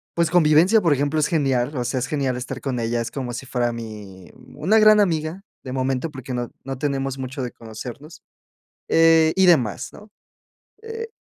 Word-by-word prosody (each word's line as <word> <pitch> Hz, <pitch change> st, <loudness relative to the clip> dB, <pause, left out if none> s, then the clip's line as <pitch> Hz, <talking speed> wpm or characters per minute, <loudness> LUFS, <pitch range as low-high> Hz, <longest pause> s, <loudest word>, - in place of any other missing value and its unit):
pues, 170 Hz, -2 st, +2 dB
convivencia, 175 Hz, +6 st, +5 dB
por 165 Hz, -4 st, +2 dB
ejemplo, 145 Hz, +3 st, 0 dB
es 150 Hz, -, +2 dB
genial. 135 Hz, -3 st, 0 dB
O 125 Hz, -, -1 dB
sea, 130 Hz, +2 st, -1 dB
es 130 Hz, -, -3 dB
genial 135 Hz, -4 st, -1 dB
estar 130 Hz, +1 st, -6 dB
con 130 Hz, -3 st, -3 dB
ella. 115 Hz, +1 st, -1 dB
Es 115 Hz, -, -5 dB
como 130 Hz, -3 st, -5 dB
si 130 Hz, +2 st, -6 dB
fuera 120 Hz, -1 st, -1 dB
mi 105 Hz, -5 st, -9 dB, 0.3 s
una 190 Hz, +10 st, +3 dB
gran 215 Hz, 0 st, +6 dB
amiga, 165 Hz, 0 st, 0 dB, 0.2 s
de 130 Hz, -, -7 dB
momento, 135 Hz, +4 st, -1 dB
porque 130 Hz, -2 st, -7 dB
no 120 Hz, -1 st, -3 dB
no 135 Hz, -1 st, -5 dB
tenemos 135 Hz, -1 st, -2 dB
mucho 130 Hz, +1 st, -5 dB
de 125 Hz, -, -4 dB
conocernos, 125 Hz, +8 st, -10 dB, 0.7 s
eh, 165 Hz, -1 st, +5 dB
y 190 Hz, -, +4 dB
demás, 125 Hz, -, +2 dB
¿no? 210 Hz, 0 st, -15 dB, 0.7 s
Eh, 455 Hz, 0 st, -6 dB
135 Hz, 185 wpm, -22 LUFS, 125-165 Hz, 0.7 s, gran